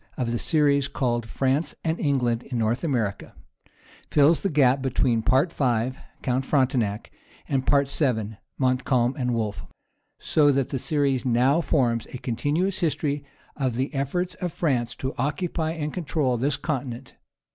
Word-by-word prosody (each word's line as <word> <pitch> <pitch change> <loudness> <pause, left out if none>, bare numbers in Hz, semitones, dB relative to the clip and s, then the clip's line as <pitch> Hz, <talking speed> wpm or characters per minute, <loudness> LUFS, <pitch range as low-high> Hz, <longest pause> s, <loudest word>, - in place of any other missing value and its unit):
of 120 -2 -1
the 120 - -1
series 145 -3 +2
called 120 -4 -1
France 135 +6 0
and 160 0 -1
England 125 -6 +1
in 125 -1 -5
North 115 +4 0
America, 120 - -2 0.7
fills 150 +2 +4
the 195 - 0
gap 135 -3 +3
between 125 -3 +1
Part 135 +9 +2
V., 125 -2 +1 0.3
"Count 130 +1 0
Frontenac," 125 -7 0 0.4
and 135 -2 -1
Part 140 -1 +4
VII., 110 -7 0 0.2
"Montcalm 130 -1 +1
and 125 -4 -1
Wolfe;" 110 -3 -2 0.5
so 145 -2 +3
that 135 -2 0
the 135 - -2
series 140 -4 0
now 130 +6 +3
forms 120 -8 +1
a - - -7
continuous 145 - -1
history 150 -4 -1 0.3
of 130 -5 -1
the 130 +5 -2
efforts 170 +6 -1
of 180 -2 -1
France 125 -8 -1
to 130 +1 -4
occupy 160 +2 -1
and 150 -2 -4
control 150 -7 0
this 135 +4 0
continent. 130 -4 -4
135 Hz, 150 wpm, -25 LUFS, 120-150 Hz, 0.7 s, fills